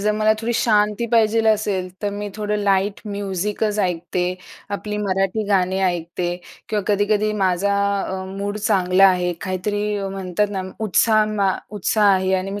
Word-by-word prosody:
जर 210 +1 +1
मला 215 0 +3
थोडी 230 +1 -1
शांती 210 0 +2
पाहिजे 225 0 +3
असेल, 205 -4 +1
तर 205 - 0
मी 205 +1 -5
थोडं 210 0 -2
लाईट 200 0 +1
म्युझिकचं 205 +1 -2
ऐकते, 180 0 -1 0.4
आपली 210 0 -5
मराठी 195 +1 0
गाणे 190 -1 +1
ऐकते 175 0 -2 0.4
किंवा 210 -1 -1
कधी-कधी 210 +1 +1
माझा 190 +2 +1 0.3
अ, 190 0 -4
मूड 200 +1 -3
चांगला 195 -3 +4
आहे 180 -1 +1
काहीतरी 200 +2 -2
अ, 195 -1 -3
म्हणतात 195 +1 -1
ना, 190 -2 -3 0.2
उत्साह 215 +1 +3
मा 200 -2 +2 0.3
उत्साह 205 +1 +3
आहे 190 0 0
आणि 190 +1 -2
मी 205 +1 -4
200 Hz, 155 wpm, -21 LUFS, 185-210 Hz, 0.4 s, चांगला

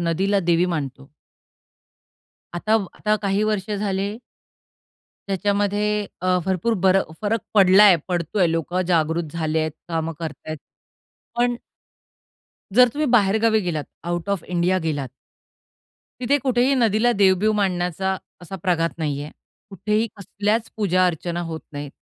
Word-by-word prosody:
नदीला 190 +4 +1
देवी 170 0 +2
मानतो. 140 -5 -4 1.5
आता 215 +5 0 0.2
आता 215 0 +1
काही 200 +1 +1
वर्ष 215 -1 -1
झाले 200 +1 -2 1.1
त्याच्यामध्ये 205 +1 0
अ, 185 0 +2
भरपूर 190 +5 0
बर 190 0 +5 0.3
फरक 215 +1 0
पडला 195 -1 +7
आहे, 190 -4 +7
पडतो 175 +2 -2
आहे, 175 -4 +4
लोकं 170 +3 -1
जागृत 160 -2 0
झाले 160 -1 -1
आहेत, 155 0 -1 0.2
कामं 165 -1 -2
करत 160 -3 -5
आहेत 155 0 -4 0.8
पण 245 0 +2 1.2
जर 250 0 +8
तुम्ही 300 +1 0
बाहेर 205 -1 +4
गावी 220 -1 +4
गेलात, 155 -3 -2 0.2
आउट 175 +2 -3
ऑफ 195 -5 -1
इंडिया 180 +1 +1
गेलात 145 -4 -2 1.1
तिथे 265 +4 +2
कुठेही 255 +1 +2
नदीला 230 -1 +3
देव-बिव 200 +2 +4
मानण्याचा 190 -1 0 0.3
असा 190 +3 -7
प्रघात 170 -3 +1
नाहीये. 145 -1 -3 0.4
कुठेही 210 +4 0
कसल्याच 210 +3 -2
पूजा-अर्चना 180 -4 0
होत 160 -1 -5
नाहीत. 145 -1 -6
190 Hz, 130 wpm, -22 LUFS, 170-210 Hz, 1.5 s, जर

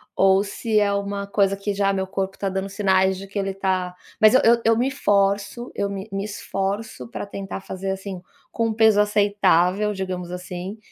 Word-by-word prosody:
ou 195 +1 +4
se 215 +1 0
é 200 -1 +2
uma 200 0 -2
coisa 200 -1 +1
que 200 +1 -2
já 200 0 +1
meu 190 -1 -1
corpo 190 0 -3
tá 195 - -2
dando 190 +1 -3
sinais 190 -1 +2
de 195 - -8
que 200 +1 -4
ele 195 -1 -2
tá 185 -2 -1 0.2
mas 215 +2 +6
eu - - +6 0.2
eu 225 0 +3
me 255 +3 +1
forço, 205 -1 0
eu 200 - -1
me 200 +1 -6
me 195 0 -2
esforço 200 - -4
pra - - -5
tentar 195 -1 -6
fazer, 195 0 -5
assim, 190 -1 -6 0.3
com 225 -1 0
peso 220 -1 +4
aceitável, 205 -1 +2
digamos, 185 -2 -4
assim, 180 +3 -6
195 Hz, 185 wpm, -23 LUFS, 190-205 Hz, 0.3 s, mas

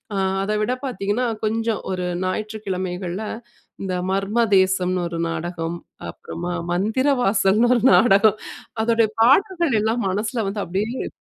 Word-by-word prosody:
ஆ - - -1 0.3
அதை 210 +1 -1
விட 245 +4 0
பார்த்தீங்கன்னா, 220 0 -1 0.2
கொஞ்சம் 225 0 -1
ஒரு 180 -1 -2 0.2
ஞாயிற்றுக்கிழமைகள்ல, 185 -2 -3 0.6
இந்த 185 -1 -2 0.2
மர்மதேசம்னு 190 -3 +2
ஒரு 170 0 -5
நாடகம், 165 +1 -4 0.3
அப்புறமா, 175 +1 -6 0.2
மந்திர 220 +9 0 0.2
வாசல்ன்னு 205 +4 +3
ஒரு 235 - 0
நாடகம். 215 -1 +5 0.5
அதோடைய 230 -1 +2
பாடல்கள்லெல்லாம் 255 - +2
மனசுல 215 +3 -1
வந்து 205 0 -3
அப்டியே, 210 +8 -3
205 Hz, 110 wpm, -22 LUFS, 185-225 Hz, 0.6 s, நாடகம்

